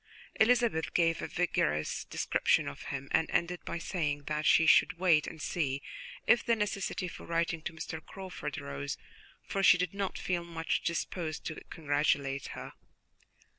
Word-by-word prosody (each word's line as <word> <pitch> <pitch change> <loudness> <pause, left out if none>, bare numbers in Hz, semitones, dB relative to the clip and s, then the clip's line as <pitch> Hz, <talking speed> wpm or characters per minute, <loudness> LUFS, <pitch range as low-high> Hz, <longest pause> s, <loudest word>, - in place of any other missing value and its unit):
Elizabeth 230 -7 +3
gave 165 -1 +3
a - - -3
vigorous 75 - 0
description - - +1
of 70 - -7
him 140 -1 -4
and 160 - +2
ended 175 +1 0
by - - -3
saying 150 -5 -2
that 150 +1 -1
she 160 - +6
should 160 - +5
wait 170 -4 +4
and 160 - -7
see 140 -5 -1 0.5
if 240 - +5
the 235 - +3
necessity 205 -3 -2
for - - -9
writing 170 -1 0
to 170 - -4
Miss 160 -1 -6
Crawford 185 -6 -6
arose, 70 0 -4 0.5
for 195 - -2
she 185 - +7
did 180 0 -1
not 200 -1 -2
feel 175 -2 -1
much 165 -1 -2
disposed 170 -2 -3
to 155 - -5
congratulate 145 -3 0
her. - - -7
165 Hz, 160 wpm, -31 LUFS, 150-180 Hz, 0.5 s, she